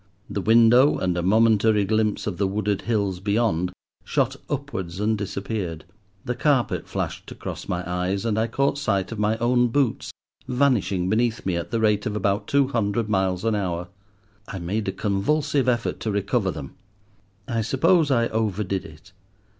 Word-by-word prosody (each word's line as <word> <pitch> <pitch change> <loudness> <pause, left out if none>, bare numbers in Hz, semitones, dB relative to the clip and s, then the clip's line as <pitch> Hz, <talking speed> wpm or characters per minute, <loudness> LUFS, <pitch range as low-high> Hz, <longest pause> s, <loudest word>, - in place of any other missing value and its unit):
The 100 - -3
window 115 +6 +5
and 90 -1 0
a 90 - 0
momentary 110 +1 +3
glimpse 110 +1 0
of 100 -4 -4
the 100 - +2
wooded 100 0 -1
hills 100 -5 0
beyond 100 -3 0 0.3
shot - - 0
upwards 90 -1 -4
and 110 +1 +1
disappeared. 100 -4 -4 0.4
The 125 - -1
carpet 135 -1 +1
flashed - - -4
across - - -7
my 90 0 -2
eyes, 90 +3 -1
and 110 -2 +1
I 110 - +1
caught 140 +4 0
sight 100 -8 0
of 115 - -5
my 105 +1 +1
own 120 +1 +3
boots 130 0 0 0.4
vanishing 125 -9 +1
beneath 115 +3 0
me 95 -2 0
at 85 - -3
the 115 - -1
rate 105 -2 +2
of 105 - -3
about 105 0 0
two 140 -1 +2
hundred 110 -3 -1
miles 95 -1 0
an 115 - +2
hour. 90 -4 -2 0.6
I 95 - -6
made 100 +5 -3
a - - +1
convulsive 130 +8 0
effort 120 -2 -1
to 110 - -3
recover 100 +1 0
them. 75 -6 -6 0.7
I 115 -1 -1
suppose 155 - +3
I 120 -3 +3
over 110 -2 -1
did 95 -1 -3
it. 80 +5 -14
105 Hz, 170 wpm, -24 LUFS, 95-115 Hz, 0.7 s, window